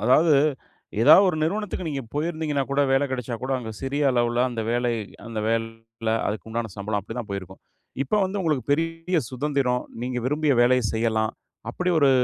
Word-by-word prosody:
அதாவது, 155 +4 +5 0.7
ஏதாவது 155 +10 +8
ஒரு 165 - 0
நிறுவனத்துக்கு 190 +1 -2
நீங்க 140 -3 -3
போயிருந்தீங்கன்னா, 155 -2 -1
கூட 140 +1 +2
வேல 135 +2 +3
கிடைச்சா 125 -2 -3
கூட, 130 - -3
அங்க 110 -2 -6
சிறிய 140 +1 +1
அளவுல 120 0 +2
அந்த 115 -2 -3
வேலை 120 0 +1 0.3
அந்த 115 -2 -4
வேல 115 0 -3 0.2
அதுக்கு 110 +1 -4
உண்டான 115 -3 -3
சம்பளம் 105 +1 -2
அப்படித்தான் 110 +1 -7
போயிருக்கும். 95 -1 -6 0.4
இப்ப 210 +9 +1
வந்து 195 +1 -2
உங்களுக்கு 150 -7 0
பெரிய 165 +3 -1
சுதந்திரம், 130 -2 0 0.2
நீங்க 125 0 -2
விரும்பிய 150 0 +2
வேலைய 125 -1 +3
செய்யலாம். 110 -1 +1 0.4
அப்படி 180 +8 -2
ஒரு 140 -2 +5
130 Hz, 160 wpm, -24 LUFS, 115-150 Hz, 0.7 s, ஏதாவது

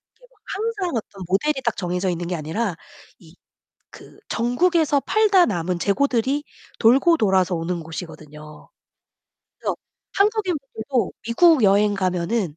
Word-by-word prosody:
이게 - - -22
막 - - -31
항상 400 - -2
어떤 200 -3 -6
모델이 265 +10 0
딱 235 - 0
정해져 180 0 -2
있는 175 0 -3
게 180 - -2
아니라 170 +6 -3 0.4
이 165 0 -18 0.6
그 - - -15
전국에서 290 +5 +1
팔다 405 0 +3
남은 180 -3 -2
재고들이 265 - 0 0.4
돌고 270 +9 +5
돌아서 190 - +2
오는 170 +2 -3
곳이거든요. 155 -2 -10 0.9
그래서 - - -3 0.4
한국인분들도 330 - -1
미국 275 +5 +4
여행 205 +1 +4
가면은 185 -2 -1
220 Hz, 295 characters per minute, -22 LUFS, 180-300 Hz, 0.9 s, 돌고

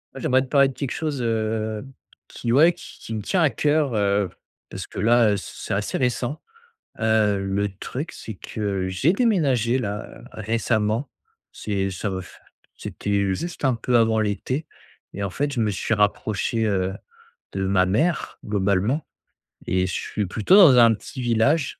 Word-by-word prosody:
J'aimerais 130 +1 +2
te 130 - -5
parler 140 0 +4
de 135 - -8
quelque 140 -1 -4
chose, 150 -5 -3
heu, 110 -1 -1 0.4
qui, 115 - -4
ouais, 155 +8 +6
qui - - -13
qui 110 - -7
me 110 - -3
tient 180 - 0
à 155 - +5
cœur, 145 +2 +1
heu, 100 -2 +1 0.4
parce - - -6
que - - -8
là 115 +2 +4
heu, - - 0
c - - -7
c'est - - -5
assez 105 +1 -2
récent. 125 +2 -1 0.6
Heu, 110 -2 +2
le 100 +1 0
truc, 145 - -5
c'est 110 - -8
que 100 -2 -3
j'ai 95 - +2
déménagé, 140 - +2
là, 105 -3 -5
récemment. 110 +2 -1 0.4
C'est 100 -2 -2
ça 95 +3 -3
va 95 -1 -3
f 90 - -14 0.4
c'était 100 -1 -1
juste 170 - -4
un 130 -2 +3
peu 120 +1 +1
avant 110 -1 +3
l'été 110 +8 -2 0.5
et 100 - -4
en 100 - -1
fait, 140 +9 -2
je 120 - -2
me 110 -2 +2
suis 100 +3 -1
rapproché, 105 +1 0
heu, 95 -3 0 0.6
de 95 0 -2
ma 95 -1 +3
mère, 125 - 0
globalement 105 +7 0 0.6
et 90 +1 +1
je - - -4
suis 105 - -2
plutôt 105 - +2
dans 170 -11 +8
un 115 -1 +7
petit 125 +4 -8
village. 125 +6 +1
110 Hz, 175 wpm, -23 LUFS, 100-130 Hz, 0.6 s, dans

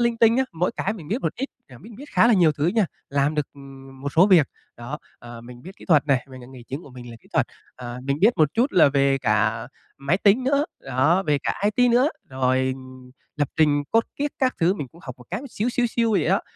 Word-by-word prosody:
linh 235 -1 +1
tinh 230 0 +5
á, 265 - +2
mỗi 170 +2 0
cái 195 - -1
mình 170 -9 -10
biết 225 +8 -1
một - - -1
ít, 270 +3 -4 0.2
à, 125 -3 -14
biết 215 - -14
biết 275 - -10
khá - - +5
là 235 - +5
nhiều 170 -5 +4
thứ 150 +1 -1
nha, 210 +2 +2 0.2
làm 140 +2 0
được, 150 -2 -1
ừm, 135 -1 -13
một 140 +1 -4
số 170 +4 +5
việc. 175 -8 +5 0.3
Đó, 120 +6 -7 0.2
ờ, 120 -1 -11
mình 120 +1 -13
biết 185 +4 -11
kỹ - - -14
thuật 155 -5 +3
nè, 135 -4 +1
mình, 130 -1 -10
ờ, 120 - -12
nghề 130 -2 -12
chính 135 +6 -7
của 140 - -14
mình 125 -1 -11
là 115 - -10
kỹ - - -24
thuật, - - +2 0.3
à, 125 0 -7
mình 140 +1 -1
biết 220 +3 +4
một 155 -2 +3
chút 245 +5 +1
là 170 - +6
về 140 -1 +2
cả 110 -1 0 0.3
máy 140 +7 0
tính 210 +5 +3
nữa, 280 +2 +2 0.2
đó, 140 +8 +1
về 150 -6 +1
cả - - -3
IT 245 +1 +3
nữa, 250 +4 +4 0.2
rồi 130 0 0 0.6
lập 145 -3 0
trình 150 -2 +3
code 225 0 +2
kiết 290 +1 -1
các 260 -1 +1
thứ 175 +3 +3
mình 145 -9 -6
cũng 170 - -19
học 130 - -7
một 125 - -14
cái 190 +8 -3
xíu 220 +2 -2
xíu 245 0 +1
xiu 230 -1 0
vậy 185 -7 +2
đó. 190 +2 +3
150 Hz, 260 wpm, -23 LUFS, 130-215 Hz, 0.6 s, là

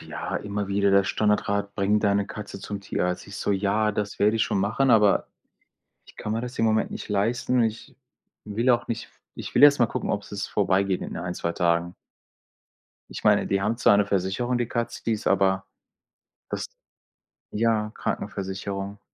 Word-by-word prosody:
Ja, - - -5
immer 100 -1 -4
wieder 100 0 +2
der 100 0 +5
Standardrat, 100 -1 0
bring 100 +2 +2
deine 100 -1 +2
Katze 105 -2 -8
zum 100 0 -5
Tierarzt. 90 -2 -2
Ich 100 -1 -9
so: - - -2
„Ja, 105 +2 +1
das 100 -1 -3
werde 105 +2 +3
ich 110 - +2
schon 100 - 0
machen.“ 110 +7 +1
Aber 105 -3 +4 0.8
ich - - -19
kann 105 - -4
mir 115 - -1
das 125 +1 -7
im 115 - +2
Moment 110 0 +2
nicht - - -7
leisten 115 +5 0
und 115 - +4
ich 110 0 -4 0.5
will 110 +4 +1
auch 120 -1 +1
nicht 115 0 -3
f - - -30 0.2
ich - - -7
will - - +4
erst 145 -1 +8
mal 120 - +4
gucken, - - -3
ob's - - -4
es - - -3
vorbei 95 +1 +2
geht 95 -2 -1
in - - -6
1, 90 0 -4
2 85 - -2
Tagen. 85 0 0 1.2
Ich - - -7
meine, 105 -1 +4
die 100 - +1
haben 105 +4 0
zwar 105 -4 +5
'ne 100 -1 +2
Versicherung, 100 +6 0
die 120 - 0
Katze, 120 -2 -3
die 115 - +1
ist, 105 - -4
aber 95 -1 +2 0.8
das, - - -3 0.9
ja, 110 -1 +1
Krankenversicherung. 100 +1 -4
105 Hz, 190 wpm, -25 LUFS, 100-110 Hz, 1.2 s, erst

